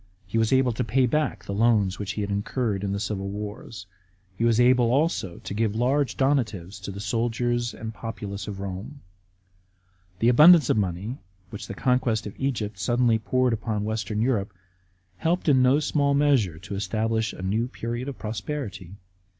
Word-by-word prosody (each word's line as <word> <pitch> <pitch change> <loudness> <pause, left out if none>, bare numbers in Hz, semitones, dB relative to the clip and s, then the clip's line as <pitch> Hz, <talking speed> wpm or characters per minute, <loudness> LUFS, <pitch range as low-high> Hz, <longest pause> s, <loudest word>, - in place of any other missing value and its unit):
He 105 +5 -1
was 110 -1 +1
able 130 -1 +4
to 110 - -2
pay 125 +4 +2
back 125 -8 -1
the 100 - -4
loans 105 -3 +2
which 100 -1 -3
he 105 - -3
had 100 0 -3
incurred 100 0 -1
in 100 - -1
the 100 - -2
civil 100 -2 -3
wars. 105 -1 -7 0.5
He 115 - -2
was 115 -1 +3
able 125 -1 +4
also 135 - 0
to - - -7
give 110 0 0
large 130 +4 +1
donatives 110 -9 0
to 95 - -6
the 100 - -8
soldiers 120 +3 -1
and 110 - -6
the 110 - -9
populace 105 -4 -6
of 100 -2 -6
Rome. 100 +9 -6 1.2
The 115 +5 +3
abundance 150 +3 +7
of - - +1
money 100 +6 -2 0.3
which 105 - -7
the 100 - -6
conquest 125 -3 +1
of 105 - -6
Egypt 110 -8 -2
suddenly 120 +2 +2
poured 130 +2 +1
upon 110 -1 -2
Western 110 0 -2
Europe 105 -6 -1 0.6
helped 170 - 0
in 135 -4 +5
no 130 +3 +4
small 145 -2 +1
measure 135 - +2
to 90 - -8
establish 110 +3 -1
a 95 - -9
new 110 +5 0
period 120 +1 -5
of 140 - -7
prosperity. 105 - -5
110 Hz, 180 wpm, -25 LUFS, 100-125 Hz, 1.2 s, abundance